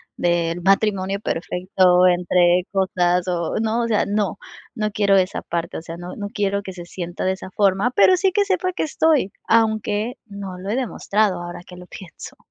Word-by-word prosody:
del 170 0 0
matrimonio 195 0 +1
perfecto 180 0 +2
entre 175 0 +3
cosas 180 -2 +1
o, 170 -2 -2
¿no?, 225 +1 0
o 235 - -1
sea, 220 -2 +1
no 205 -1 -1 0.4
no 215 -1 -1
quiero 200 -1 +3
esa 185 0 0
parte, 170 -1 -4
o - - -11
sea, 165 +1 -8
no 175 +1 -8
no 205 - -5
quiero 200 -2 -1
que 190 -2 -8
se 175 -1 -9
sienta 175 +1 -5
de 185 - +2
esa 190 - -9
forma, 200 +3 +2
pero 370 - +6
sí 385 +1 +2
que 405 +2 +2
sepa 370 -1 0
que - - -3
estoy, 305 -8 +1 0.2
aunque 220 0 +1
no 200 -3 -8
lo 190 +2 -6
he 215 - 0
demostrado 215 -6 0
ahora 175 0 -7
que 180 - -12
lo 180 0 -12
pienso. 180 -2 -11
195 Hz, 190 wpm, -21 LUFS, 180-215 Hz, 0.4 s, pero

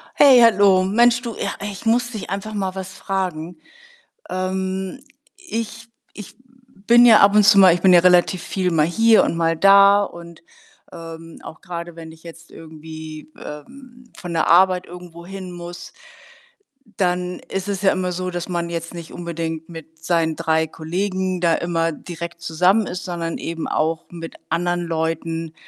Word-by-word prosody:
Hey, 270 -4 +7
hallo. 200 -5 +5
Mensch, 235 +5 +3
du, 235 -3 -6
ja, - - -3
ich 200 +1 -7
muss 240 +2 +1
dich 215 -6 -7
einfach 200 +3 -5
mal 195 -2 -3
was 190 0 -7
fragen. 180 -3 -4 0.7
Ähm, 190 +4 -3 0.3
ich 230 - -6 0.3
ich 210 0 -11 0.5
bin 240 +1 +7
ja 225 -3 +7
ab 200 +1 +5
und 210 0 +5
zu 200 0 +6
mal 185 -3 +7
ich 175 - -3
bin 190 - +6
ja 175 - +7
relativ 180 0 +3
viel 185 -2 -2
mal 155 -3 +2
hier 225 +6 +4
und - - -2
mal 165 0 +1
da. 200 +2 +6
Und, 170 -3 -11 0.5
ähm, 165 -1 -10
auch 160 - -11
grade, 170 -1 -8
wenn 165 -1 -10
ich 160 0 -18
jetzt 165 -1 -13
irgendwie, 155 -1 -11
ähm, 245 - -12
von 175 -1 -7
der 165 -2 0
Arbeit 180 +1 +4
irgendwo 175 -1 -12
hin 190 -1 -8
muss 175 0 -9 1.1
dann 180 -1 -1
ist 195 0 -4
es 200 -1 -3
ja 195 - +4
immer 185 -1 -2
so, 185 +1 -4
dass 175 +1 -5
man 170 -1 -3
jetzt 170 0 -5
nicht 170 -2 -9
unbedingt 165 -1 -5
mit 160 -1 -12
seinen 165 -2 0
3 160 -1 0
Kollegen 185 +3 -3
da 170 -2 +3
immer 165 -1 -1
direkt 170 +1 -8
zusammen 180 +6 +2
ist, 180 - -6
sondern 170 -2 -4
eben 165 -1 -5
auch 160 +1 -1
mit 165 -1 -9
anderen 175 0 -1
Leuten, 165 -1 -3
180 Hz, 170 wpm, -20 LUFS, 165-195 Hz, 1.1 s, Hey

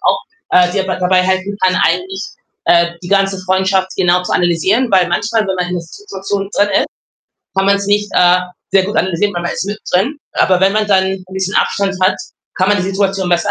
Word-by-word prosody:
auch, - - +1 0.3
äh, 180 -1 +4
dir 190 -1 -1
bei 185 - -2
dabei 185 0 +2
helfen 190 +2 -1
kann, 185 0 +3
eigentlich, 380 +1 -2 0.5
äh, 170 0 +3
die 175 - -8
ganze 195 -1 +1
Freundschaft 190 0 +1
genau 180 -1 +2
zu - - -3
analysieren, 185 +8 +1
weil 185 -2 +3
manchmal, 215 +4 0
wenn 190 - -1
man 180 - -1
in 180 - -3
'ner 175 - -3
Si 170 - -13
Situation 195 - -4
drin 205 0 +2
ist, - - -4 0.7
kann 195 - +2
man 200 0 +4
es 200 0 -4
nicht, 205 0 +1
äh, 180 0 +5 0.3
sehr 195 -1 +4
gut 205 +2 -4
analysieren, 190 +3 0
weil 175 - -3
man 175 - -2
ist - - -3
mit 205 +1 -4
drin. 240 +12 +1
Aber 185 -1 +2
wenn 190 +1 +3
man 215 0 0
dann 190 -2 +4
'n 190 -1 -4
bisschen 190 0 -3
Abstand 195 -1 0
hat, 185 - +3 0.4
kann 185 +1 +1
man 205 - +3
die - - -1
Situation 195 -1 -1
besser 175 +3 +1
190 Hz, 225 wpm, -15 LUFS, 180-200 Hz, 0.7 s, äh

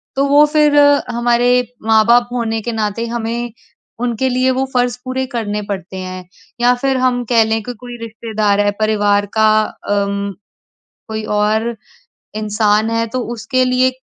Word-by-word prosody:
तो 275 +1 +2
वो 290 +2 +6
फिर 300 -1 +4
अ, 285 0 +5
हमारे 240 +1 +2 0.4
माँ-बाप 235 +2 +4
होने 225 -2 -2
के 235 - -3
नाते 220 +1 -2
हमें 235 +1 -3 0.5
उनके 245 +1 0
लिए 255 +1 +2
वो 260 +1 0
फ़र्ज़ 245 -1 +1
पूरे 260 +1 -2
करने 210 -3 -2
पड़ते 190 -1 -5
हैं। 185 0 -6 0.4
या 245 +1 +5
फिर 265 +1 0
हम 250 -1 +1
कह 230 -2 +5
लें 220 0 -1
कि 245 +3 -6
कोई 245 -1 -9
रिश्तेदार 215 -2 -1
है 205 0 +2
परिवार 205 -1 +2
का 220 0 +5
अ, 205 - -5
उम, 200 0 -3 0.8
कोई 220 0 -4 0.2
और 220 +3 0 0.6
इंसान 215 0 +1
है 230 0 0
तो 255 +3 -3
उसके 250 +3 0
लिए 255 +1 +2
230 Hz, 160 wpm, -17 LUFS, 215-250 Hz, 0.8 s, वो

